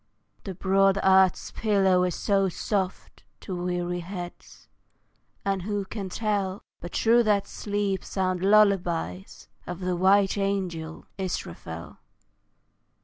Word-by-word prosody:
The 190 - -5
broad 195 +1 +3
earth's 190 -1 +4
pillow 195 -4 +2
is 180 - -2
so 195 -2 +1
soft 190 +1 -3 0.2
To 185 - -5
weary 175 0 -2
heads, 175 0 -9 0.8
and 195 -1 0
who 205 +1 -2
can 195 -1 -6
tell 200 -2 -2 0.2
But 175 - -8
through 235 +1 +4
that 205 -2 +2
sleep 205 -2 -2
sound 185 -2 -1
lullabies 185 - +2 0.2
Of 180 0 -5
the 180 -1 -1
white 195 +2 +3
angel, 180 -5 -3
Israfel? 85 - -5
190 Hz, 115 wpm, -26 LUFS, 180-200 Hz, 0.8 s, earth's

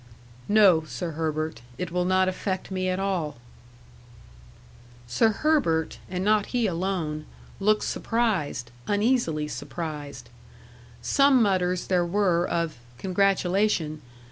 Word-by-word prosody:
"No, 200 -6 +6
Sir 155 +4 -5
Herbert; 155 -3 -3 0.2
it 180 +2 -4
will 180 0 0
not 185 0 +3
affect 185 0 -3
me 185 0 -1
at 185 +1 -1
all." 180 -8 -2 1.7
Sir 120 - +3
Herbert, 215 - +1
and 180 +1 -3
not 210 -1 +3
he 245 -2 0
alone 170 -5 -2 0.3
looked 210 +2 +2
surprised 185 - -1 0.2
uneasily 205 -8 +1
surprised. 145 -2 -6 0.7
Some 275 - +4
mutters 185 -4 +1
there 180 -2 +2
were 175 -1 +1
of 165 -6 -2 0.2
"congratulation." 190 - +1
180 Hz, 110 wpm, -26 LUFS, 155-200 Hz, 1.7 s, No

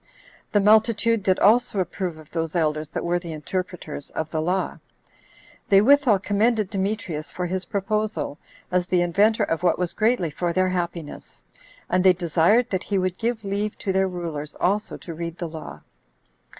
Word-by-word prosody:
The 205 - +4
multitude 220 +2 +4
did 185 -1 +2
also 220 0 +3
approve 180 -2 -3
of 155 -1 -15
those 165 0 -3
elders 155 -2 0
that - - -4
were 175 +1 +1
the 170 -2 -7
interpreters 160 -2 -5
of 160 0 -4
the 155 - -1
law. 180 +4 -1 0.9
They 195 - +7
withal 265 -1 +5
commended 210 +1 +1
Demetrius 190 -6 -3
for 180 - -4
his 185 +1 -3
proposal, 210 -5 -2 0.3
as 180 -1 +1
the 180 -1 +2
inventor 210 +5 +3
of 165 -5 -1
what 175 -2 +2
was 180 -1 -2
greatly 215 -7 +1
for 170 +3 -2
their 185 +1 +2
happiness; 170 -4 -5 0.4
and 180 +1 +1
they 190 -1 +7
desired 180 +7 +3
that 185 -2 0
he 200 - 0
would 185 -1 -1
give 230 -2 -2
leave 205 +2 -2
to 190 - -2
their 190 0 +2
rulers 165 -5 -5
also 205 +4 0
to 170 - -8
read 170 +1 -5
the 175 - -4
law. 160 0 -9
185 Hz, 175 wpm, -24 LUFS, 170-210 Hz, 0.9 s, They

